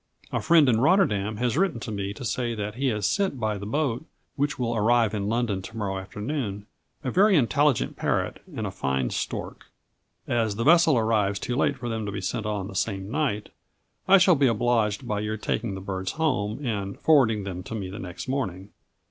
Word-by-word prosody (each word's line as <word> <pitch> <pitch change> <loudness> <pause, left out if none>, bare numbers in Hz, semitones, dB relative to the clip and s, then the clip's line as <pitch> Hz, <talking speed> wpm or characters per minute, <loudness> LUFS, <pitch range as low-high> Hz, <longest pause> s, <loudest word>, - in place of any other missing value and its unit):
A - - -1
friend 165 -4 +5
in 115 -2 +3
Rotterdam 110 - +2
has 120 +1 0
written 180 -7 +1
to 115 - -5
me 100 -1 -3
to 130 - -7
say 120 +1 -1
that 105 -1 -4
he 135 +4 -1
has 105 -4 0
sent 195 -10 0
by 110 -2 -1
the 100 - -6
boat, 135 +1 -1 0.3
which 145 +1 -1
will 120 -2 -1
arrive 115 0 +3
in 100 -1 -2
London 115 -4 0
to 110 +4 -9
morrow 95 -3 -2
afternoon, 105 +1 -4 0.4
a 130 - -2
very 200 - +5
intelligent 145 -1 +2
parrot - - -1
and - - -3
a - - -3
fine 65 -2 -1
stork. - - -4 0.6
As 115 -3 0
the 115 - -1
vessel 165 -1 +5
arrives 110 -3 +1
too 120 - -3
late 140 0 +1
for 120 -2 -6
them 110 -2 -3
to - - -3
be 100 - -4
sent 110 +3 -3
on 105 -3 -2
the - - -9
same 95 0 -2
night, 135 -8 -1 0.6
I 195 +1 +8
shall 185 0 +6
be 140 -3 +3
obliged 115 -3 +1
by 105 -1 -1
your 105 +1 -2
taking 110 -1 -2
the 95 - -6
birds 95 -1 -3
home, 135 -5 -1
and 100 -4 -3
forwarding 120 -9 +4
them 90 -2 -5
to 105 +5 -7
me 100 -4 -4
the 100 - -7
next 90 +4 -7
morning. 100 -8 -3
110 Hz, 205 wpm, -26 LUFS, 100-135 Hz, 0.6 s, I